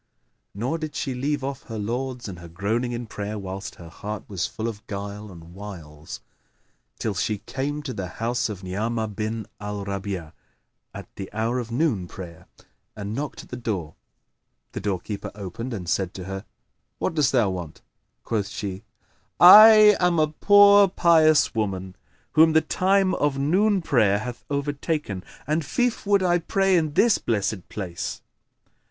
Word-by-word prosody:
Nor 125 +11 -2
did 155 -2 -5
she 135 - -2
leave 140 +3 -2
off 135 0 -4
her 115 -3 -6
lauds 120 +3 -3
and 90 -4 -8
her 85 - -10
groaning 105 +8 -2
in 120 0 -4
prayer 105 0 -5
whilst 95 0 -6
her 85 -2 -12
heart 105 +5 -7
was 95 -3 -2
full 110 - -5
of 105 -3 -7
guile 100 0 -6
and 85 -1 -13
wiles, 85 -7 -9 0.8
till 110 - -2
she 105 +2 -1
came 145 +7 -4
to 135 -3 -4
the 95 -4 -4
house 115 +5 -2
of 100 -3 -7
Ni'amah 110 +4 -2
bin 110 +1 -4
al 105 -1 -5
Rabi'a 95 -5 -4 0.6
at - - -9
the 95 - -6
hour 115 +4 -1
of 120 -2 -5
noon 120 - 0
prayer, 85 -2 -10 0.5
and 105 0 -5
knocked 145 +4 -5
at - - -18
the - - -5
door. 100 -10 -4 0.8
The - - -5
doorkeeper 100 +1 -3
opened 105 +5 -6
and 95 -7 -5
said 95 +1 -1
to 95 - -6
her, 95 +1 -6 0.5
"What - - -1
dost 150 -4 +2
thou 120 -7 +2
want?" 90 -4 -7 0.4
Quoth 105 -3 -1
she, 100 -1 -5 0.6
"I 215 +3 +10
am 180 -1 +2
a 155 -1 +3
poor 205 +4 +6
pious 155 - +4
woman, 95 -4 -3 0.4
whom 160 +1 +5
the 160 - +5
time 190 +4 +2
of 145 -1 0
noon 190 +7 +2
prayer 110 -10 +3
hath 120 +3 -7
overtaken, 145 - -2 0.2
and 155 +3 0
fief 245 - -1
would 200 -2 +3
I 175 -1 +3
pray 195 +2 +1
in 155 -4 +1
this 225 +6 +4
blessed 105 -4 -2
place." 90 -5 -5
115 Hz, 165 wpm, -24 LUFS, 100-150 Hz, 0.8 s, I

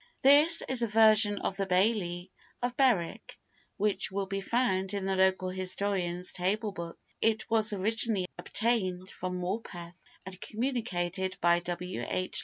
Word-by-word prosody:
[THIS 295 +5 +6
is 260 -2 +1
a 235 - +2
version 215 -1 +5
of 195 - -2
the 195 -1 -1
Baillie 180 -2 0 0.3
of 245 0 -1
Berwick, 240 - +1 0.4
which 205 -1 0
will 195 0 -2
be 195 +1 -3
found 195 -4 0
in 195 -1 -3
the 195 0 0
Local 190 0 +2
Historian's 185 -1 -1
Table 205 +4 -1
Book. 170 -3 -7 0.2
It 220 -1 +1
was 220 0 +3
originally 210 0 0
obtained 190 -5 -1
from 180 0 -4
Morpeth, 175 -2 -5 0.3
and 185 0 -8
communicated 190 -7 -2
by 170 0 +4
W. 175 +1 -5
H. 185 0 -2
195 Hz, 145 wpm, -30 LUFS, 180-220 Hz, 0.4 s, THIS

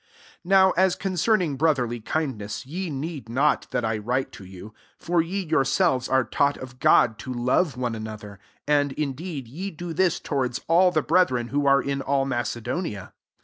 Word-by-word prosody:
9 175 - -12
NOW 190 -1 +6
as 185 0 +3
concerning 185 -5 0
bro 155 +2 +3
therly 120 -3 -3
kindness, 130 -8 -3
ye 175 +6 -4
need 145 -4 -5
not 140 +6 +1
that - - -1
I 110 -1 -1
write 125 +5 -2
to - - -11
you: 95 +3 -11 0.2
for 175 0 +1
ye 190 +4 -3
your 160 -4 +2
selves 135 -4 +1
are 130 -1 +3
taught 140 +3 +1
of 125 -1 -10
God 110 -3 +4
to 130 - -6
love 125 +4 +1
one 125 -2 -2
another: 110 -2 -8 0.3
10 145 -1 +2
apd - - -7
in 140 -1 -2
deed 150 -3 -6
ye 175 +11 -5
do 175 -1 -7
this 175 0 +1
towards 130 -4 -2
all 180 +3 +5
the 155 -4 0
brethren 130 -8 +2
who 145 0 0
are 140 -1 +4
in 140 0 -2
all 135 0 0
Mace 120 -3 -2
donia. 115 - -4
140 Hz, 195 wpm, -24 LUFS, 120-170 Hz, 0.3 s, NOW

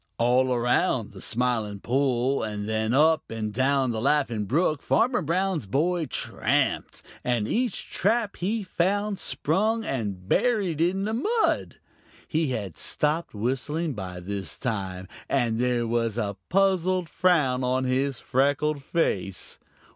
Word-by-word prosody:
All 125 +2 +3
around 125 0 +1
the - - -11
Smiling 115 -4 0
Pool 130 +2 +1
and 105 -2 -3
then 110 0 0
up 155 +4 +3
and 110 -2 -4
down 130 +1 +2
the 110 -1 -3
Laughing 130 -6 +1
Brook 155 - +1
Farmer 245 +2 +2
Brown's 175 - -1
boy 160 - +1
tramped, - - -1 0.2
and 120 -4 0
each 240 - -1
trap 215 +1 +1
he 210 +4 -1
found 195 +2 0
sprung 215 +8 0
and 100 - -3
buried 200 - +1
in 185 +3 +1
the 215 +2 -1
mud. 435 - 0 0.5
He 160 0 0
had 105 - -4
stopped 150 -2 -1
whistling 135 +8 -1
by 95 -5 -6
this 100 +1 -5
time, 95 -6 -3 0.2
and 120 -4 +1
there 125 -1 +1
was 115 -1 0
a 100 -4 -1
puzzled 185 -1 +2
frown 150 -9 +2
on 130 +1 +1
his 130 0 0
freckled 145 +3 +1
face. 100 - -2
135 Hz, 135 wpm, -26 LUFS, 115-175 Hz, 0.5 s, All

